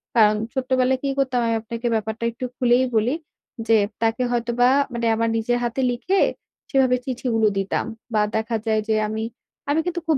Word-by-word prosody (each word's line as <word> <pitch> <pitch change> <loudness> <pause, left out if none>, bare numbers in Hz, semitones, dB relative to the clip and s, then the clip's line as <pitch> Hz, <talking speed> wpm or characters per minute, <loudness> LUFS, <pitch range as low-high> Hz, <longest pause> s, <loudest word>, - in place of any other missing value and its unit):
কারণ 215 -2 +5 0.2
ছোটবেলায় 260 0 +1
কি 275 - 0
করতাম 260 -2 +1
আমি 230 - +1
আপনাকে 230 +2 -4
ব্যাপারটা 220 +1 -3
একটু 255 +2 -6
খুলেই 250 +1 +3
বলি। 235 +7 +2 0.5
যে 225 -1 +5 0.2
তাকে 225 +2 +1
হয়তোবা 240 +1 +2 0.2
মানে 235 0 -2
আমার 230 0 +1
নিজের 240 +2 0
হাতে 240 +2 -1
লিখে 370 +11 0 0.5
সেভাবে 260 -3 +3
চিঠিগুলো 240 -4 0
দিতাম 195 +2 -1 0.3
বা 210 - +3
দেখা 220 +1 0
যায় 220 -1 +2
যে 220 - +2
আমি, 220 +1 -3 0.5
আমি 300 +3 +2
কিন্তু 350 -1 -2
খুব 310 -4 +3
240 Hz, 170 wpm, -22 LUFS, 225-255 Hz, 0.5 s, কারণ